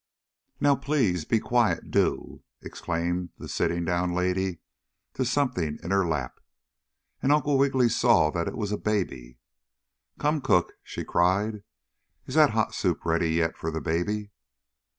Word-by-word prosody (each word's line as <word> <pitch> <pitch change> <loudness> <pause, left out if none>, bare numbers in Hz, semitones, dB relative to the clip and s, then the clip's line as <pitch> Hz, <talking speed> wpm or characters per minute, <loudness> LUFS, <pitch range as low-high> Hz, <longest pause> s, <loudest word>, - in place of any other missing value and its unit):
"Now 145 -1 +4
please 130 - 0
be 115 - +2
quiet 120 0 0
do!" - - 0 0.2
exclaimed 85 +1 -3
the - - -9
sitting 85 +1 -1
down 90 +1 0
lady 90 0 0 0.6
to 130 - -1
something 120 - 0
in 85 - -4
her 95 -2 +2
lap, 75 -6 -3 0.8
and 135 - +2
Uncle 145 -1 +3
Wiggily 135 -2 +3
saw 115 -9 +3
that 85 0 -2
it - - -4
was 105 -2 -2
a 105 - -2
baby. 65 - -2 0.8
"Come, 150 0 0
cook!" 105 -9 +2
she - - -6
cried. 100 +4 +1 0.6
"Is - - -7
that - - +6
hot - - 0
soup - - -1
ready 80 0 +1
yet 80 -1 +1
for 80 - -4
the 80 0 -3
baby?" 100 +7 -2
95 Hz, 150 wpm, -26 LUFS, 85-120 Hz, 0.8 s, that